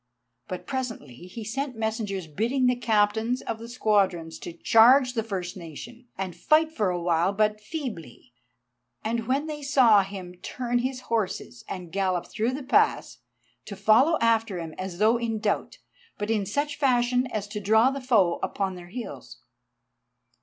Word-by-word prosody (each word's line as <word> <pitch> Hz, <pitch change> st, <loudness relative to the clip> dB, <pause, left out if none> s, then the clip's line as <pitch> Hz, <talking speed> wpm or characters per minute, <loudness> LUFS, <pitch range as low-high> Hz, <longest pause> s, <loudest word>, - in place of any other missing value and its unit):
But 185 Hz, -, -6 dB
presently 255 Hz, -, -4 dB
he 225 Hz, +5 st, -8 dB
sent 265 Hz, +4 st, -3 dB
messengers 220 Hz, -4 st, -2 dB
bidding 230 Hz, -, 0 dB
the 250 Hz, 0 st, +3 dB
Captains 225 Hz, +1 st, +1 dB
of 225 Hz, -1 st, -4 dB
the 230 Hz, +1 st, -9 dB
squadrons 195 Hz, -8 st, 0 dB
to -, -, -7 dB
charge 245 Hz, +8 st, +5 dB
the 230 Hz, -, 0 dB
first 190 Hz, -4 st, -4 dB
nation, 190 Hz, -, -10 dB
and 185 Hz, -3 st, -4 dB
fight 310 Hz, -, +3 dB
for 215 Hz, -11 st, 0 dB
a 180 Hz, -1 st, -1 dB
while 170 Hz, +1 st, +2 dB
but 210 Hz, +1 st, +1 dB
feebly, 210 Hz, -, -7 dB, 0.7 s
and 230 Hz, +2 st, -1 dB
then 225 Hz, -, -7 dB
when 275 Hz, +4 st, +1 dB
they 300 Hz, -1 st, -5 dB
saw 255 Hz, -7 st, +5 dB
him 190 Hz, -2 st, -7 dB
turn 245 Hz, +5 st, -2 dB
his 255 Hz, +1 st, -3 dB
horses 220 Hz, 0 st, -3 dB
and 180 Hz, -3 st, -6 dB
gallop 185 Hz, -2 st, 0 dB
through 230 Hz, +4 st, -2 dB
the 280 Hz, +1 st, -5 dB
pass, 425 Hz, +11 st, +2 dB, 0.5 s
to 200 Hz, -, -7 dB
follow 220 Hz, -, +4 dB
after 225 Hz, -4 st, +2 dB
him 165 Hz, -2 st, -6 dB
as 185 Hz, -2 st, -5 dB
though 220 Hz, +4 st, +4 dB
in 230 Hz, -2 st, -2 dB
doubt, 210 Hz, -1 st, -2 dB, 0.4 s
but 205 Hz, +2 st, -2 dB
in 205 Hz, -3 st, 0 dB
such 285 Hz, +6 st, -2 dB
fashion 250 Hz, -2 st, +2 dB
as 215 Hz, -4 st, -4 dB
to 210 Hz, 0 st, -4 dB
draw 220 Hz, +5 st, +4 dB
the 275 Hz, 0 st, -5 dB
foe 210 Hz, -9 st, +3 dB
upon 195 Hz, -2 st, -2 dB
their 175 Hz, -1 st, -10 dB
heels. 175 Hz, -, -8 dB
220 Hz, 165 wpm, -26 LUFS, 190-250 Hz, 0.7 s, charge